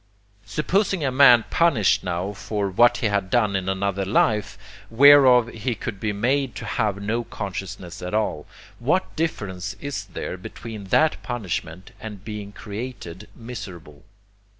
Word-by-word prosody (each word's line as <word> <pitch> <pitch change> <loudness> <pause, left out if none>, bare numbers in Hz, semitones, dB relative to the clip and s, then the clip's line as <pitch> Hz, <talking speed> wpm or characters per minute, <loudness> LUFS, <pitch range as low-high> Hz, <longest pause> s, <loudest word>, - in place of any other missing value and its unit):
Supposing 185 - 0
a 135 - +1
man 125 -4 +7
punished 155 - +3
now 90 +2 -3
for 100 0 -3
what 120 +5 +4
he 110 - -3
had 100 -2 0
done 105 -4 +2
in 95 0 -1
another 100 0 -1
life, 105 +1 +1 0.3
whereof 130 -1 +7
he 120 +1 -3
could 105 -1 -6
be 110 0 -1
made 125 +5 0
to 110 - -6
have 105 -2 -1
no 110 +4 -2
consciousness 95 -4 -7
at 90 +3 -4
all, 105 -8 -1 0.3
what 150 +10 0
difference 100 - -3
is 140 -9 -5
there 95 -1 -6
between 105 +3 -9
that 155 +11 +2
punishment 95 -7 -5
and 105 -4 -9
being 105 -2 -6
created 105 -3 -8
miserable? 95 -11 -9
105 Hz, 145 wpm, -23 LUFS, 95-125 Hz, 0.3 s, man